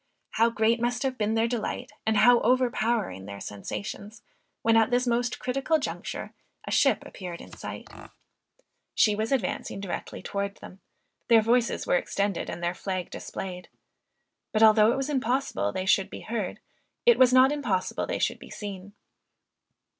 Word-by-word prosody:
How 230 +1 +3
great 230 +1 +1
must 245 +2 0
have 265 -1 -1
been 220 -1 0
their 225 +1 +2
delight, 235 -2 -3 0.2
and 220 -1 +3
how 245 +2 +6
overpowering 235 - 0
their 100 0 -7
sensations, 105 - -7 0.4
when 225 0 +4
at 225 +1 +4
this 250 0 +2
most 240 0 0
critical 275 +5 0
juncture 295 - -5 0.3
a - - -5
ship - - +3
appeared 180 -4 -8
in - - -12
sight! - - -8 1.1
She 210 - +4
was 220 +3 -2
advancing 215 -5 -1
directly 195 -3 -6
towards 200 -1 -3
them; 190 - -12 0.5
their 230 -2 +6
voices 235 +1 +1
were - - +3
extended 200 - -2
and 175 - -6
their 175 +1 0
flag 185 -1 -4
displayed. 180 -1 -7 0.8
But 215 0 +3
although 215 0 +7
it 250 - -1
was 270 0 -1
impossible 260 - 0
they 185 - -3
should 195 0 +3
be - - -8
heard, 215 -5 -4 0.5
it 475 -1 +6
was 255 -1 +7
not 255 +2 +6
impossible 230 -11 -1
they - - -2
should - - -1
be - - -12
seen. 200 -1 -7
225 Hz, 160 wpm, -27 LUFS, 195-245 Hz, 1.1 s, although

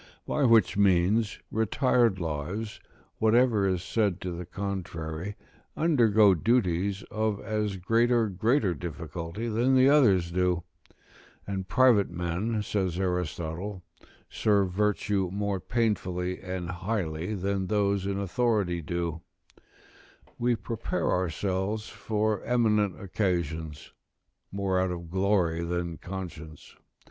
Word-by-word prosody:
By 145 - +1
which 115 -2 +5
means, 100 +3 +3
retired 115 -1 +2
lives, 85 +7 -4 0.4
whatever 110 -2 +3
is 90 -1 -1
said 100 -3 0
to 90 - -3
the 85 0 -6
contrary, 90 -2 -5 0.4
undergo 110 - +5
duties 95 -1 +1
of 110 -2 -1
as 105 -2 -2
great 115 +6 +2
or 115 -2 +3
greater 110 +1 +1
difficulty 85 - -5
than 120 +4 +2
the 130 +1 +6
others 100 - +4
do; 90 -1 +1 0.8
and 95 -2 -4
private 120 -2 +4
men, 90 +6 -2
says 95 -4 -1
Aristotle,' 90 +1 -3 0.4
serve 100 -3 +1
virtue 100 -1 0
more 100 0 -1
painfully 90 -5 -1
and 90 -2 -4
highly 90 0 -3
than 95 0 -1
those 100 -2 +1
in 100 0 -1
authority 100 -3 0
do: 85 0 -3 1.2
we 120 0 +2
prepare 110 +1 -2
ourselves 95 +4 -1
for 105 +1 -1
eminent 105 -5 +1
occasions, 85 -6 -2 0.6
more 95 -1 0
out 95 0 +1
of 85 -2 -6
glory 95 -3 +1
than 85 -1 -3
conscience. 85 -5 -8
95 Hz, 115 wpm, -28 LUFS, 90-110 Hz, 1.2 s, the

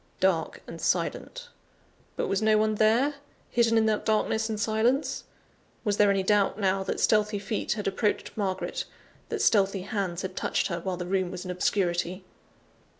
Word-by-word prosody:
Dark 185 -4 0
and - - -9
silent. - - -2 0.7
But - - -1
was 195 +1 0
no 215 0 +4
one 215 0 +2
there, 225 +7 +3 0.4
hidden 230 -1 +3
in 220 - +4
that 215 -1 +1
darkness 220 +1 +1
and 215 -1 -3
silence? 230 +6 +1 0.6
Was 205 -3 0
there 205 -1 +5
any 195 -1 +2
doubt 200 0 +2
now, 195 -1 +1
that 190 - -3
stealthy 210 -1 +3
feet 205 +2 -2
had 210 -2 -5
approached 200 +2 -1
Margaret, 190 -3 -2 0.4
that - - -1
stealthy 195 -3 +3
hands 195 -3 -3
had 190 0 -5
touched - - 0
her, 170 -1 -2
while 180 +1 -3
the 180 - -4
room 185 0 0
was 185 0 -7
in 180 - -3
obscurity? 180 0 0
205 Hz, 170 wpm, -27 LUFS, 190-220 Hz, 0.7 s, there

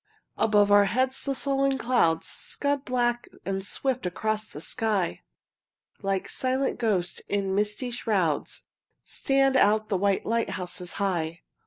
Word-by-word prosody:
Above 205 -2 +3
our 205 0 +7
heads 255 +5 +1
the 275 -1 -2
sullen 275 0 +1
clouds 235 -11 +2
Scud 285 -1 -2
black 240 -1 0 0.2
and 195 0 -2
swift 255 +5 0
across 215 +4 -2
the - - -9
sky; 205 +1 -1 0.8
Like 195 -1 -1
silent 260 +1 -1
ghosts 195 -7 0
in 200 -1 0
misty 210 +5 -1
shrouds 195 - -1 0.4
Stand 270 -1 +1
out 215 -3 +3
the 195 - +1
white 200 +1 +1
lighthouses 180 -5 -1
high. 170 -4 -2
215 Hz, 130 wpm, -27 LUFS, 195-255 Hz, 0.8 s, our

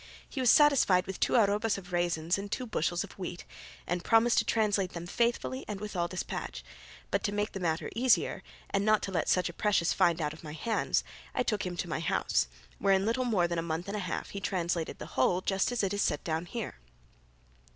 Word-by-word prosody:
He 275 - -6
was 250 - +4
satisfied 270 -12 +5
with 190 -1 -6
two - - +2
arrobas 210 -1 +3
of 180 -2 -10
raisins 175 0 +1
and 200 +1 -6
two 255 - -2
bushels 175 -5 -1
of - - -10
wheat, 175 -1 -5 0.4
and 175 0 -2
promised 230 +1 +4
to - - +2
translate 205 -4 +1
them 170 0 -6
faithfully 240 +6 0
and 210 -2 -4
with 210 -1 -6
all 175 -1 +1
despatch; 185 +1 -5 0.5
but - - +1
to 205 - 0
make 205 +1 -1
the 195 - -5
matter 165 -3 -1
easier, 250 +1 +2 0.3
and 200 - +1
not 215 0 +3
to 195 - -3
let 180 - 0
such 180 - +3
a 170 - -6
precious 195 -3 +2
find 170 -1 +3
out 150 -2 -1
of 155 - -13
my 150 -1 -7
hands, 220 +8 0 0.3
I - - +2
took 210 -6 -1
him 175 -1 -5
to 175 - -2
my 160 - -2
house, 165 - +1 0.3
where 195 -1 +4
in 190 +1 +1
little 245 +3 +1
more 195 -8 +2
than 170 -1 -1
a - - 0
month 165 +2 -3
and 200 - -3
a - - -1
half 180 -3 -4
he 200 - -4
translated 175 -4 -2
the - - -7
whole 175 +7 +3
just 195 +4 +1
as 245 -3 -1
it 195 0 0
is 205 - 0
set 150 - 0
down 160 +1 -2
here. 225 - -5
190 Hz, 230 wpm, -30 LUFS, 175-215 Hz, 0.5 s, satisfied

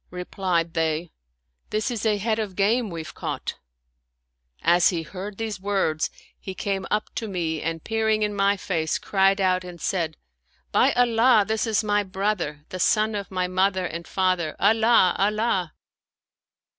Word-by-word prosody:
" - - -44
Replied 180 -2 -2
they, 160 0 -1 0.3
" 60 0 -48
This 215 +4 -1
is 225 -2 -1
a 210 -1 +2
head 220 +2 -1
of 205 -4 -4
game 215 +4 +2
we've 165 -3 -7
caught." - - -5 1.0
As 175 +1 +5
he 170 -3 -2
heard 195 +4 -7
these 220 -3 -4
words, 190 -6 0 0.3
he 190 - -7
came 195 -1 -2
up 210 0 -1
to 225 - -4
me 165 -5 -2
and 165 0 -3
peering 220 -1 +1
in 210 0 0
my 200 0 +2
face, 160 -5 -1
cried 195 0 +2
out 185 -1 +2
and 180 -1 -9
said, 165 -4 -2 0.3
" - - -40
By - - +4
Allah, 235 -2 +4
this 220 +1 0
is 220 0 +1
my 205 -1 +2
brother, 190 -6 -2
the 185 - -6
son 215 +4 +2
of 200 -1 -4
my 185 -1 -1
mother 185 0 +1
and 170 0 -6
father! 185 -4 0
Allah! 220 -2 +4
Allah 200 -4 0
195 Hz, 170 wpm, -24 LUFS, 175-215 Hz, 1.0 s, As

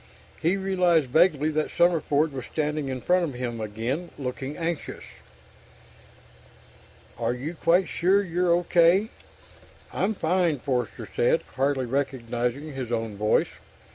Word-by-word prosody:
He 175 +5 +2
realized 180 -7 +2
vaguely 155 -1 +3
that 155 0 -1
Summerford 160 -3 +2
was 130 -3 -6
standing 150 -2 -1
in 130 -1 -4
front 180 +5 +2
of 145 -6 -3
him 120 -2 -4
again, 115 +11 -3
looking 135 +1 -5
anxious. 170 -2 -4 2.2
"Are 120 - 0
you 140 +7 -5
quite 175 +2 +2
sure 195 +4 +2
you're 180 -1 0
okay?" 175 +4 +4 0.8
"I'm 215 +3 0
fine," 175 -3 +1
Forster 125 -3 -3
said, - - +2
hardly 135 -1 +1
recognizing 130 +1 -2
his 130 -3 -5
own 115 -3 -2
voice. 105 +1 +2
150 Hz, 125 wpm, -26 LUFS, 125-175 Hz, 2.2 s, okay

